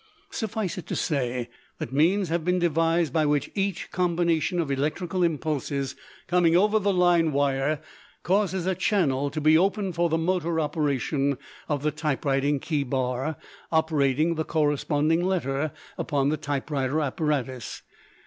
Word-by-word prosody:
Suffice 220 -5 -3
it - - -10
to - - -3
say 125 -5 -1 0.3
that 125 - -6
means 175 +6 +3
have 165 0 0
been 180 +2 +1
devised 165 -2 +1
by 160 - +3
which 145 -2 0
each 195 -3 -2
combination 175 -1 +1
of 155 -4 -1
electrical 165 +6 -1
impulses 150 -4 -1 0.3
coming 175 -1 +3
over 210 +3 +3
the 200 0 +1
line 175 -3 +3
wire 140 +1 +1 0.4
causes 190 -1 +1
a 190 - +1
channel 145 -9 +1
to 155 - -4
be 155 +1 +5
opened 195 +2 +2
for 170 +1 +1
the 160 - +1
motor 170 -1 0
operation 145 -2 0 0.3
of 145 -2 -1
the 150 - +1
typewriting 145 -1 0
key 150 0 -1
bar 130 +3 -2 0.3
operating 160 -1 +2
the 160 -1 -2
corresponding 150 +1 +1
letter 155 -5 0 0.3
upon 140 -1 +1
the 155 - 0
typewriter 145 0 -1
apparatus. 135 -6 -2
155 Hz, 145 wpm, -26 LUFS, 140-175 Hz, 0.4 s, be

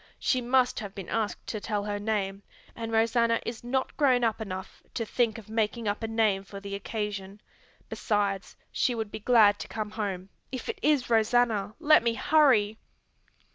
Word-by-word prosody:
She 255 - +1
must 250 +1 +2
have 205 -3 -7
been 195 -4 -7
asked 220 -2 -2
to 215 - -4
tell 210 -2 -2
her 205 0 -3
name, 205 -2 -2 0.3
and 225 -1 -5
Rosanna 230 +1 +2
is 230 -1 -5
not 260 +2 -2
grown 255 -5 +3
up 225 -1 0
enough 190 -3 -7
to 230 - -1
think 230 0 0
of 220 - -11
making 220 +1 -1
up 205 +2 -1
a 225 - -2
name 220 -3 +1
for 200 0 -9
the 200 0 -7
occasion. 200 -1 -4 0.5
Besides 200 -3 -1
she 245 - +1
would 220 -2 -4
be - - -6
glad 210 -2 +5
to - - -6
come 215 -1 -4
home. 195 -4 -4 0.2
If 255 - -5
it 445 -3 -4
is 290 -5 +2
Rosanna 220 -2 +2
let 310 -1 +6
me 235 -1 0
hurry!" 235 -8 +3
220 Hz, 180 wpm, -28 LUFS, 205-240 Hz, 0.5 s, let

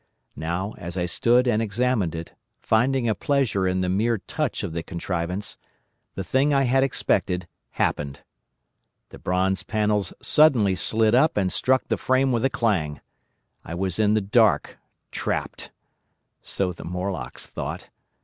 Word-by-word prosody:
"Now 85 +7 -3
as 85 +1 -6
I 90 - 0
stood 120 +8 +3
and 110 -2 +2
examined 110 -5 0
it, 80 0 -7 0.3
finding 125 +2 +2
a 110 - +3
pleasure 110 -5 0
in 95 0 0
the 90 - 0
mere 110 +5 +1
touch 130 +5 -3
of 90 -5 -4
the 85 - -2
contrivance, 90 +2 -4 0.6
the 95 - -3
thing 135 +9 +2
I 135 - +4
had 135 +1 +3
expected 90 -8 0 0.3
happened. 70 -1 -1 0.9
The - - -12
bronze 95 +1 0
panels 105 -4 0
suddenly 125 -11 +4
slid 110 +4 +2
up 135 +3 +4
and 95 -3 +1
struck 130 0 +1
the - - 0
frame 130 +1 +2
with 115 -2 0
a 135 - +3
clang. 85 - 0 0.6
I 85 - -6
was 95 +2 -1
in 105 0 +3
the 110 - +2
dark—trapped. 100 +1 -1 0.7
So 95 -2 -2
the - - -10
Morlocks 90 +1 -4
thought. - - -6
100 Hz, 150 wpm, -24 LUFS, 90-120 Hz, 0.9 s, I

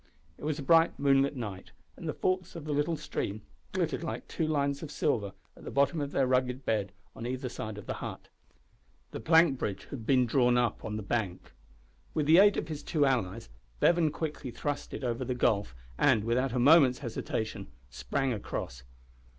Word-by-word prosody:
It - - -13
was 155 -1 -1
a 145 - -5
bright 165 +3 +4
moonlight 140 0 +3
night, 105 -7 -6 0.2
and 165 - -6
the - - -1
forks 185 -1 -1
of 165 -3 -7
the 155 - -3
little 150 +3 0
stream 105 -7 -4 0.3
glittered - - -1
like - - -5
two 160 - -2
lines 140 -2 0
of 155 - -6
silver, 110 -10 0 0.2
at - - -15
the - - -6
bottom 140 +3 +2
of 140 0 -3
their 135 - +2
rugged 130 0 0
bed 105 -4 0 0.2
on 115 - -5
either 130 +1 -3
side 110 -3 -6
of 105 - -9
the - - -3
hut. - - -7 0.8
The - - -5
plank 160 +2 +4
bridge 100 - -3
had 115 -6 -7
been 130 -2 +4
drawn 125 0 +3
up 120 -3 0
on 105 0 -4
the 105 - -5
bank. 100 -4 -3 0.6
With 155 - +1
the 160 +4 +7
aid 205 0 +6
of - - -2
his 155 -2 -5
two 150 -2 +1
allies 120 - -1 0.3
Bevan 170 -2 +4
quickly 150 -3 -4
thrust 145 +4 -4
it - - -7
over 120 -2 -1
the 125 - -2
gulf, 105 - +1 0.2
and, 105 - +4
without 125 +3 +1
a - - 0
moment's 135 -1 +6
hesitation, 110 -1 -3 0.2
sprang 135 - -1
across. 65 - -5
130 Hz, 195 wpm, -30 LUFS, 115-150 Hz, 0.8 s, the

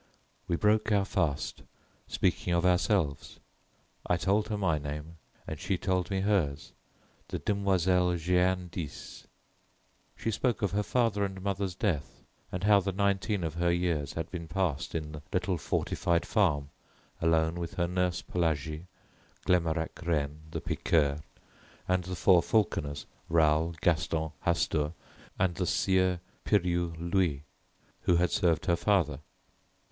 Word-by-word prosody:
We 85 - +1
broke 105 +4 +2
our 100 -2 +3
fast, 80 -8 -1 0.5
speaking 90 - 0
of 85 +1 +1
ourselves. 90 -5 +1 0.7
I 90 - +2
told 100 +4 +1
her 105 - -2
my 85 -6 +1
name 75 +3 -6 0.3
and 80 - -6
she 95 - -1
told 90 -1 0
me 95 -1 0
hers, 80 -9 0 0.6
the - - -3
Demoiselle 95 -3 +2
Jeanne 90 +2 +1
d'Ys. 85 -5 -7 0.9
She 115 - -1
spoke 120 +1 0
of 100 - +1
her 105 +2 +1
father 105 -1 +1
and 95 -1 -3
mother's 100 -2 -2
death, 90 -8 -2 0.3
and 90 +1 -4
how 105 0 +6
the 95 0 -2
nineteen 100 0 0
of 80 - -2
her 85 +1 +1
years 85 -5 0
had 80 -1 -4
been 85 -3 -5
passed 85 -4 -1
in 75 -2 -3
the 75 -1 -8
little 90 -1 0
fortified 85 +2 0
farm 75 -10 +1 0.5
alone 80 +1 +2
with 85 -1 -5
her 85 -1 +1
nurse 90 -1 0
Pelagie, 80 -1 -2 0.6
Glemarec 85 -2 +1
René 75 -4 -1
the - - -4
piqueur, 75 -3 +1 0.7
and 90 -1 +1
the 90 0 -4
four 90 0 +5
falconers, 75 -10 0 0.2
Raoul, 80 0 +3
Gaston, 80 -1 +1 0.2
Hastur, 80 -2 +1 0.4
and 90 -2 +2
the 90 +1 -2
Sieur 95 -2 +2 0.2
Piriou 85 -4 +1
Louis, 85 -4 0 0.6
who 90 - +4
had 85 0 +2
served 85 -3 +2
her 85 -3 +3
father. 85 -8 +1
85 Hz, 140 wpm, -30 LUFS, 80-95 Hz, 0.9 s, how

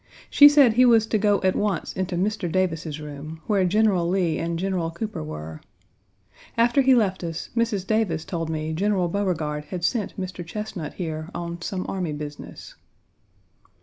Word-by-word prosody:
She 290 0 +9
said 285 -6 +5
he 250 +3 +5
was 230 -3 +5
to 220 -1 0
go 205 -1 +3
at 185 0 +2
once 205 -5 -1
into 185 -1 -3
Mr. 190 -1 -1
Davis's 165 -4 -1
room, 150 +1 -8
where 205 -4 +2
General 190 -3 +2
Lee 175 -4 +1
and 170 0 -2
General 180 -2 -1
Cooper 210 - -5
were. 75 +1 -7 1.0
After 240 +4 +4
he 265 -1 +5
left 195 -6 +1
us, 165 -1 -5
Mrs. 225 -5 0
Davis 195 -8 0
told 165 -3 -3
me 155 0 -3
General 190 0 +1
Beauregard 165 -6 -2
had 175 +3 -6
sent 210 +1 -1
Mr. 185 -2 -5
Chesnut 180 -2 -6
here 160 -2 -4
on, 170 0 -5
some 185 +1 -3
army 180 -5 -3
business. 145 0 -8
180 Hz, 165 wpm, -24 LUFS, 160-210 Hz, 1.0 s, She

